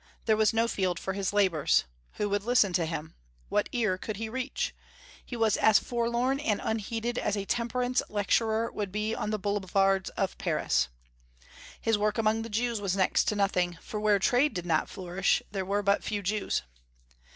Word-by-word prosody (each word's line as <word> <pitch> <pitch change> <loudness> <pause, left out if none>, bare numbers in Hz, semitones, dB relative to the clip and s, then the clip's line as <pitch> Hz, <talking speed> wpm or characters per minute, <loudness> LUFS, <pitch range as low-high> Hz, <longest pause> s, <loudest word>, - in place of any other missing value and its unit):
There 220 - +4
was 215 0 +3
no 225 0 +2
field 185 -5 0
for 190 - -3
his 195 0 -1
labors. 180 -7 +3 0.3
Who 210 - -1
would 205 0 0
listen 225 -5 +3
to 170 -2 +1
him? 160 -1 -5 0.4
What - - +1
ear 215 -6 0
could 215 0 -5
he 220 +1 -4
reach? 260 +3 -3 0.5
He 245 - -7
was 225 -2 +2
as 220 -2 +5
forlorn 240 +3 0
and 220 -8 0
unheeded 225 +2 -2
as 205 - -1
a 200 - -3
temperance 245 +2 0
lecturer 220 +2 +1
would 205 -3 -4
be 210 +2 -1
on 210 - -2
the 215 - 0
boulevards 195 -1 +1
of - - -1
Paris. 65 0 +1 0.9
His 225 -2 +1
work 210 0 +1
among 220 0 +2
the 230 - -6
Jews 230 0 -1
was 195 -1 -1
next 190 - +3
to 210 - 0
nothing, 180 -4 +1
for 210 - -6
where 210 -1 +3
trade 245 +9 +2
did 175 -1 -3
not 160 -3 +1
flourish 185 +1 0
there 195 -2 -3
were 200 +2 0
but 200 0 +2
few 205 -2 -3
Jews. 205 - -1
210 Hz, 185 wpm, -29 LUFS, 195-225 Hz, 0.9 s, as